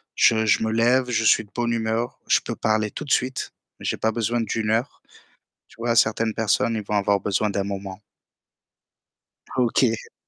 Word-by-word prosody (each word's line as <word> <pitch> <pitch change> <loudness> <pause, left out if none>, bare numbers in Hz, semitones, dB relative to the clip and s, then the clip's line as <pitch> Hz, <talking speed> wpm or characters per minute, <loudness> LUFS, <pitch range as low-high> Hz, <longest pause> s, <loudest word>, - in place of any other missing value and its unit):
Je 110 -1 +4
je 110 - +3
me 110 - 0
lève, 125 +3 +2
je 115 -2 0
suis 110 - +4
de 105 - -27
bonne 120 -1 0
humeur. 115 +1 -2
Je - - +4
peux - - -5
parler 110 -1 0
tout 150 - -7
de 140 - -7
suite 130 +1 0 0.3
mais - - -10
j'ai - - 0
pas 110 - 0
besoin 115 +1 -1
d'1 110 0 -2
heure. 115 +5 -1 0.7
Tu - - -20
vois? 115 0 0
Certaines 110 0 +2
personnes, 110 +1 +1
ils 105 - -4
vont 105 - -4
avoir 100 0 +2
besoin 105 +2 0
d'un 100 0 -1
moment. 100 -1 -6 1.6
OK. 125 +1 +3
Ah, - - +4
oui. 115 - -6
110 Hz, 200 wpm, -23 LUFS, 105-120 Hz, 1.6 s, Je